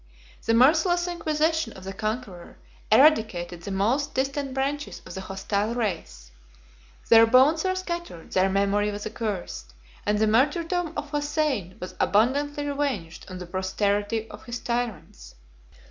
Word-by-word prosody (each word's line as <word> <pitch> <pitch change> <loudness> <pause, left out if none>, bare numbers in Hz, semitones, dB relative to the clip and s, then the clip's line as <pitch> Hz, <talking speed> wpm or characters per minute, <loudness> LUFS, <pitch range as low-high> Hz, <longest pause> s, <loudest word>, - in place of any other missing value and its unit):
The 230 - +2
merciless 330 +8 +4
inquisition 320 -5 0
of 190 - -12
the 195 +1 -6
conqueror 215 -4 -5 0.3
eradicated 215 - +4
the 185 - -7
most 235 +10 0
distant 275 +1 -1
branches 280 +2 -2
of - - -9
the 190 - -5
hostile 200 +3 -2
race: 160 - -4 0.8
their 225 0 +8
bones 270 +7 +5
were 375 0 +1
scattered, 345 - -5
their 190 +1 +3
memory 200 +2 +1
was 205 0 -5
accursed, 185 - -5 0.3
and 210 0 +1
the 220 - +3
martyrdom 320 - +1
of 295 -1 -5
Hossein 290 - -1
was 180 - -7
abundantly 285 +7 +1
revenged 275 - -3
on 185 - -7
the 180 - -7
posterity 205 +4 -1
of 210 - -11
his 240 0 -4
tyrants. 235 - -4
225 Hz, 140 wpm, -25 LUFS, 195-290 Hz, 0.8 s, their